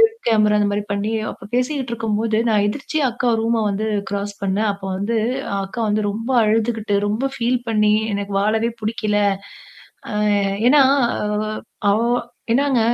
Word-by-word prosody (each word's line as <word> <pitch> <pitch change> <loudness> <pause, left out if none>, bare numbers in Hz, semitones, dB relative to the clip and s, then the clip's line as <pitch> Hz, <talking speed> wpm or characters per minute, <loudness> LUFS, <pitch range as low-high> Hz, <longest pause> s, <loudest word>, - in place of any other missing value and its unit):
Web 450 0 +3
camera 210 -1 +4
அ - - +2
இந்த 205 0 +2
மாரி 205 0 -1
பண்ணி, 205 +2 -1 0.2
அப்ப 195 - -12
பேசிக்கிட்டு 255 0 -1
இருக்கும்போது 220 0 0
நான் 205 -1 +3
எதிர்ச்சியா 290 +4 -1
அக்கா 245 0 0
ரூம 230 -1 +1
வந்து 210 +2 -2 0.2
கிராஸ் 200 0 -3
பண்ணேன். 205 +2 +1
அப்போ 200 -1 -8
வந்து 225 +4 -1 0.5
அக்கா 215 +5 -6
வந்து 215 +1 +1
ரொம்ப 225 +5 -5
அழுதுகிட்டு 220 -1 +1
ரொம்ப 220 +6 -1
ஃபீல் 245 0 0
பண்ணி 210 -1 +3 0.2
எனக்கு 200 0 -4
வாழவே 220 +3 +1
புடிக்கல. 215 -1 0 0.9
அ - - -5 0.6
ஏன்னா 290 +1 +6 0.4
அ - - -1 0.6
அவ 205 - +3 0.5
என்னாங்க 270 -1 +2
220 Hz, 155 wpm, -20 LUFS, 205-235 Hz, 0.9 s, ஏன்னா